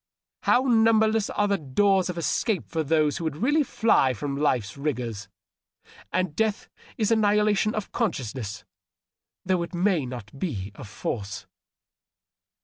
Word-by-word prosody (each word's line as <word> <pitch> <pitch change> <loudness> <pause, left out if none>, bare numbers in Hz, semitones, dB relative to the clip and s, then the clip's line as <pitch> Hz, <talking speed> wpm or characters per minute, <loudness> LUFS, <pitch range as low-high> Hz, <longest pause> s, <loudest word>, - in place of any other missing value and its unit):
How 250 - +3
numberless 225 -3 +3
are 205 - +1
the 200 -1 +1
doors 185 +7 +2
of 180 - -4
escape 190 +4 0
for 160 - -2
those 155 -1 +2
who - - -5
would 160 -3 -2
really 290 - +2
fly 220 - +2
from 140 +4 -3
life's 125 -8 0
rigors! 125 -7 -3 0.8
And 185 -4 -1
death 220 -1 0 0.3
is 220 -1 +1
annihilation 210 -1 +3
of 215 -2 -4
consciousness, 115 - -3 0.8
though 185 -1 +1
it 170 +1 -5
may 175 -6 +1
not 125 0 -9
be 105 - -3
of 105 - -10
force." 100 -3 -5
170 Hz, 140 wpm, -26 LUFS, 130-210 Hz, 0.8 s, How